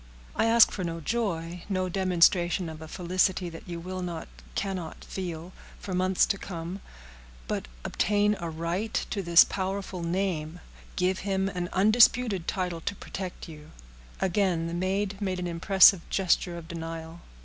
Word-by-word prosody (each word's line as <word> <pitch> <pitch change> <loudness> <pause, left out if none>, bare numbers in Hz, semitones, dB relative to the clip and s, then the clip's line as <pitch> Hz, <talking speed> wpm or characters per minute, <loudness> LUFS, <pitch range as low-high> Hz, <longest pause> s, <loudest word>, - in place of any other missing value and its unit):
"I - - +2
ask 230 0 +6
for 190 - -4
no 165 -1 -3
joy—no 185 -1 -2
demonstration 180 -1 +2
of 160 0 -9
a 160 - -8
felicity 180 +1 0
that 165 +2 -11
you 170 -1 -4
will 185 +2 -5
not, 175 -2 -5 0.3
cannot 185 -4 -4
feel, 175 -1 -6 0.3
for 190 - -6
months 185 +1 +3
to 200 - -2
come; 175 +1 -6 0.7
but - - -3 0.2
obtain 210 0 +2
a 170 - -4
right 170 +7 -3 0.2
to 200 - -1
his 170 -2 +7
powerful 190 -1 -4
name—give 180 +1 -2
him 195 0 0
an 180 -2 -4
undisputed 215 -1 +4
title 180 -3 -2
to 200 - -3
protect 185 -1 -7
you—" 155 -1 -11 0.5
Again 185 -3 +1
the 165 - -4
maid 195 +3 -1
made 190 -2 -1
an 180 - -3
impressive 180 +2 +6
gesture 180 -2 +1
of 165 -1 -9
denial. 165 0 -7
180 Hz, 150 wpm, -28 LUFS, 170-195 Hz, 0.7 s, his